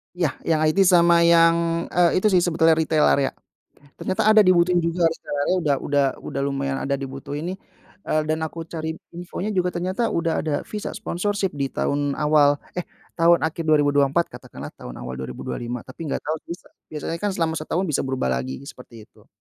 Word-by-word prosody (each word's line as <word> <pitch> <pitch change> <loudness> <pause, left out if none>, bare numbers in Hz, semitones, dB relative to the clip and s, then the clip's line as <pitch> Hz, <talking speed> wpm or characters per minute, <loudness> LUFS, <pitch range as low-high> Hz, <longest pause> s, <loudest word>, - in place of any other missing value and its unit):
Ya, 165 -7 0
yang 160 -2 +1
IT 155 - +1
sama 170 -2 +5
yang, 170 0 +3
eee, 175 0 +3
itu 215 - +2
sih 185 -4 +3
sebetulnya, 165 -1 +3
retail 155 -1 +2
area. 140 -1 +2 0.6
Ternyata 190 +2 -2
ada 215 - +8
dibutuhin 180 -2 +4
juga 170 +1 0
retail 165 -2 -2
area, 185 - +2
udah 145 -4 +2
udah 145 -1 +2 0.2
udah 140 - -3
lumayan 140 -1 -2
ada 140 0 -1
dibutuhin 140 +5 -5
nih, - - -10 0.4
eee, 155 -5 0
dan 155 +1 -1
aku 165 +1 -5
cari 160 -1 -5 0.2
infonya 180 +4 -5
juga 180 -1 +1
ternyata 185 +6 -1
udah 165 -1 0
ada 155 -2 -1
Visa 210 -1 -5
Sponsorship 205 -2 -2
di 140 -2 -2
tahun 145 0 -1
awal 150 -1 +4 0.2
eh, 180 - -2 0.3
tahun 170 -1 +4
akhir 160 +1 -3
2024, 145 0 +3
katakanlah - - -9
tahun - - -10
awal 65 +1 -6
2025. 120 - -5
Tapi 130 +5 -12
nggak - - -3
tahu 155 +1 -1
visa 170 - -7 0.2
biasanya 155 +2 -4
kan 205 - 0
selama 165 -4 -1
setahun 160 +4 -2
bisa 155 - 0
berubah 130 - -1
lagi, 65 +1 -3
seperti 120 -5 -12
itu. - - -25
160 Hz, 180 wpm, -23 LUFS, 145-175 Hz, 0.6 s, ada